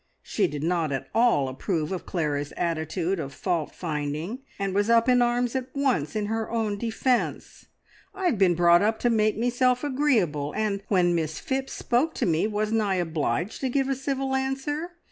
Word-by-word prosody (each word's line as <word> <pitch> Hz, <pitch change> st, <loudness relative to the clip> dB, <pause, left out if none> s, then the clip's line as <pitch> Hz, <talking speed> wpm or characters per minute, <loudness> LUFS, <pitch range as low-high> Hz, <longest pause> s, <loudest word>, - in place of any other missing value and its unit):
She -, -, 0 dB
did 145 Hz, 0 st, -5 dB
not 165 Hz, -2 st, 0 dB
at 135 Hz, -, -3 dB
all 230 Hz, -, +3 dB
approve 155 Hz, +5 st, -2 dB
of 185 Hz, -, -4 dB
Clara's 145 Hz, -4 st, -2 dB
attitude 170 Hz, +2 st, -1 dB
of 140 Hz, -3 st, -5 dB
fault 170 Hz, -5 st, -2 dB
finding, 155 Hz, -, -3 dB, 0.2 s
and 195 Hz, -1 st, -2 dB
was 205 Hz, +3 st, +1 dB
up 230 Hz, +1 st, +4 dB
in 250 Hz, -1 st, +5 dB
arms 240 Hz, +1 st, +1 dB
at 260 Hz, -1 st, -1 dB
once 255 Hz, -, 0 dB
in 210 Hz, -1 st, 0 dB
her 225 Hz, +1 st, -2 dB
own 220 Hz, -3 st, -1 dB
defence. 235 Hz, +2 st, -1 dB, 0.5 s
"I 385 Hz, -1 st, -4 dB
have 280 Hz, -, +2 dB
been 180 Hz, -3 st, +4 dB
brought 175 Hz, 0 st, +5 dB
up 220 Hz, +2 st, +2 dB
to 240 Hz, -, +3 dB
make 215 Hz, -2 st, +2 dB
meself 245 Hz, +2 st, +1 dB
agreeable, 220 Hz, -, +1 dB
and 210 Hz, -2 st, 0 dB
when 180 Hz, -3 st, +3 dB
Miss 160 Hz, -2 st, -1 dB
Phipps 265 Hz, 0 st, -3 dB
spoke 260 Hz, +7 st, 0 dB
to -, -, 0 dB
me, 165 Hz, +3 st, +2 dB
wasn't 215 Hz, +1 st, 0 dB
I 200 Hz, -3 st, +1 dB
obliged 165 Hz, -, -1 dB
to 265 Hz, -, 0 dB
give 270 Hz, +1 st, 0 dB
a 270 Hz, -, +1 dB
civil 270 Hz, 0 st, -2 dB
answer? 270 Hz, +6 st, -2 dB
210 Hz, 185 wpm, -26 LUFS, 170-250 Hz, 0.5 s, in